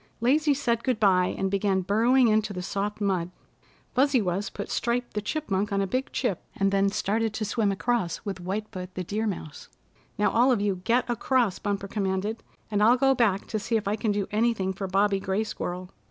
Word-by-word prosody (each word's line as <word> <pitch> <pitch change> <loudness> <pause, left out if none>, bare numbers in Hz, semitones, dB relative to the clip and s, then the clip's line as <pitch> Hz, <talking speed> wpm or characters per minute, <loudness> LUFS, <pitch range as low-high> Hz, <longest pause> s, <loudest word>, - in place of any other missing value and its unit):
Lazy 290 +5 +3
said 235 -4 0
good 255 -4 0
bye, 185 -4 +3
and 195 0 -1
began 195 -1 +1
burrowing 230 +7 +3
into 215 -1 +2
the 180 -1 -5
soft 200 +3 -3
mud. 185 -4 0 0.6
Fuzzy 275 0 +3
Wuzz 195 0 -1
put - - -6
Stripe 240 +1 -1
the 210 - -1
Chipmunk 210 -5 -2
on 200 - +1
a 195 - +1
big 255 +8 -2
chip, 220 -9 -1
and 195 0 +1
then 195 0 +3
started 215 +2 -1
to 215 - -2
swim 210 -1 +1
across 195 -3 -1
with 195 -2 -4
White 195 +4 -3
Foot 185 0 -7
the 185 - -3
Deer 215 +5 -2
Mouse. 160 -6 -6 0.5
"Now 210 - +2
all 245 +3 +4
of 240 - +2
you 200 -3 -1
get 240 +2 +2
across," 240 -3 +1
Bumper 200 -1 -2
commanded, 200 +2 -2 0.3
"and 205 -1 +1
I'll 235 +4 +6
go 270 +1 +4
back 220 -6 +1
to 215 - -1
see 225 +2 0
if 215 -2 -4
I 205 - +1
can 215 0 -1
do 205 -1 0
anything 210 -3 +1
for 195 +1 -4
Bobby 195 +1 +2
Gray 195 +3 -1
Squirrel." 180 -3 -5
205 Hz, 210 wpm, -26 LUFS, 195-235 Hz, 0.6 s, I'll